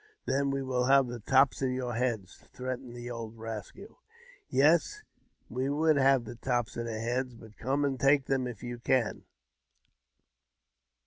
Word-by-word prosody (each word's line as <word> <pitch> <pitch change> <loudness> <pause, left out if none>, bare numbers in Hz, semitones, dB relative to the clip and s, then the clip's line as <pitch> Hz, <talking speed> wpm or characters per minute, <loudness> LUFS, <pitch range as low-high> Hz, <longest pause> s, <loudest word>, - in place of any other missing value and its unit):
" - - -49
Then 140 +1 +1
we 135 0 -1
will 125 -1 0
have 135 +1 +5
the 120 -1 -6
tops 135 +5 +3
of 130 - +1
your 125 -1 -2
heads," 115 -6 -2
threatened 125 -1 -5
the 120 0 -6
old 115 -1 -6
rascal. 110 - -8 0.3
" - - -25
Yes, 170 - +3 0.4
you - - -10
v^ould 150 0 +3
have 135 -2 +4
the - - -7
tops 120 -1 -1
of 115 0 -3
our - - -3
heads; 120 +3 -2
but 110 -2 -14
come 140 +4 0
an( 135 -2 -1
take 140 0 +4
them, 130 -2 0
if 120 -3 -8
you 120 -1 -5
can." 120 -2 0
125 Hz, 175 wpm, -30 LUFS, 120-135 Hz, 0.4 s, have